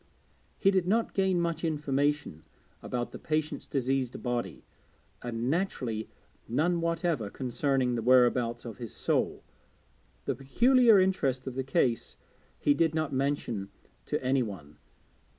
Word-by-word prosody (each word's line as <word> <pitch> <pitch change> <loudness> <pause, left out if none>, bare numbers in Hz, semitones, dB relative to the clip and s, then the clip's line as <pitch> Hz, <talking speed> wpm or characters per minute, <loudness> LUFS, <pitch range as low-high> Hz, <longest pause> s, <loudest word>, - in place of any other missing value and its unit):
He 195 - +4
did 190 -2 +1
not 225 +4 +1
gain 190 -2 +2
much 170 -1 -1
information 145 - -1 0.4
about 120 -1 -3
the - - -8
patient's 155 -1 -2
diseased 130 -2 -1
body, 120 -1 -3 0.6
and 120 0 -3
naturally 130 - -1 0.4
none 170 +8 +1
whatever 165 - 0
concerning 130 +1 0
the 120 - -1
whereabouts 120 -1 +3
of 115 - -7
his 115 -3 -7
soul. - - 0 0.8
The 135 - 0
peculiar 225 - +5
interest 140 -9 +1
of 130 - -4
the 130 +1 -2
case 130 -4 0 0.4
he 145 - +3
did 160 0 +1
not 155 -3 -1
mention 130 -7 -1 0.4
to - - -1
any 130 +1 +2
one. 85 -10 -7
135 Hz, 135 wpm, -29 LUFS, 120-165 Hz, 0.8 s, peculiar